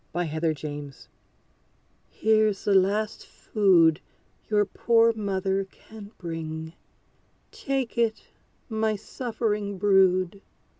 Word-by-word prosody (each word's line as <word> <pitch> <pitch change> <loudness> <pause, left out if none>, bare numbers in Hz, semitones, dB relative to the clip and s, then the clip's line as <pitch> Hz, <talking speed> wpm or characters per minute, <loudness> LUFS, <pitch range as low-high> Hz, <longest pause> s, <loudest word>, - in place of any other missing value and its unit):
=The 175 +1 -1
Stricken 150 -2 -3
Bird= 135 - -14 1.1
Here's 215 -2 +1
the 205 - +3
last 205 +3 +1
food 175 -7 +3 0.5
your 210 -1 +3
poor 230 +3 +3
mother 195 -2 -1
can 205 +1 -13
bring! 160 -2 -6 0.8
Take 270 -4 -3
it, 225 -2 +1 0.4
my 220 -1 0
suffering 210 -2 -3
brood. 190 -1 +3
200 Hz, 95 wpm, -26 LUFS, 170-220 Hz, 1.1 s, the